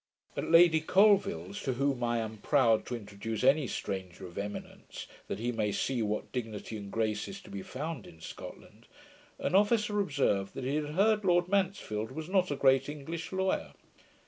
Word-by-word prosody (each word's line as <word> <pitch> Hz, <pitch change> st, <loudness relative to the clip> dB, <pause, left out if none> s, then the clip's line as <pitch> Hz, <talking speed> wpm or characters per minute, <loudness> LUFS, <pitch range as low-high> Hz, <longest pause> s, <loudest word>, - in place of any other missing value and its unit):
At -, -, -3 dB
Lady 165 Hz, -1 st, +7 dB
Colvill's, 200 Hz, +2 st, +3 dB
to 130 Hz, -, -1 dB
whom 135 Hz, -1 st, 0 dB
I 120 Hz, 0 st, +1 dB
am 110 Hz, -1 st, -3 dB
proud 120 Hz, -6 st, +3 dB
to 125 Hz, -, -3 dB
introduce 105 Hz, +1 st, -5 dB
any 135 Hz, +1 st, +4 dB
stranger 95 Hz, -3 st, -5 dB
of 85 Hz, -, -11 dB
eminence, 105 Hz, +1 st, -7 dB, 0.2 s
that -, -, -3 dB
he 120 Hz, +3 st, -1 dB
may 110 Hz, -3 st, 0 dB
see 125 Hz, +3 st, -1 dB
what 105 Hz, 0 st, -2 dB
dignity 110 Hz, -3 st, -5 dB
and 100 Hz, -2 st, -7 dB
grace 110 Hz, -2 st, -1 dB
is 195 Hz, -, -7 dB
to -, -, -14 dB
be 100 Hz, -1 st, -5 dB
found 145 Hz, +3 st, -5 dB
in 80 Hz, -, -15 dB
Scotland, -, -, -10 dB, 0.5 s
an -, -, -2 dB
officer 210 Hz, +1 st, +3 dB
observed, 135 Hz, -, 0 dB
that -, -, -5 dB
he 135 Hz, +2 st, -1 dB
had 150 Hz, 0 st, -2 dB
heard 210 Hz, +2 st, +3 dB
Lord 175 Hz, -2 st, +3 dB
Mansfield 185 Hz, -, -1 dB
was 160 Hz, +3 st, -6 dB
not 185 Hz, -1 st, +2 dB
a 145 Hz, -, -1 dB
great 135 Hz, 0 st, +3 dB
English 160 Hz, +3 st, -6 dB
lawyer. 190 Hz, 0 st, -1 dB
135 Hz, 180 wpm, -31 LUFS, 110-180 Hz, 0.5 s, Lady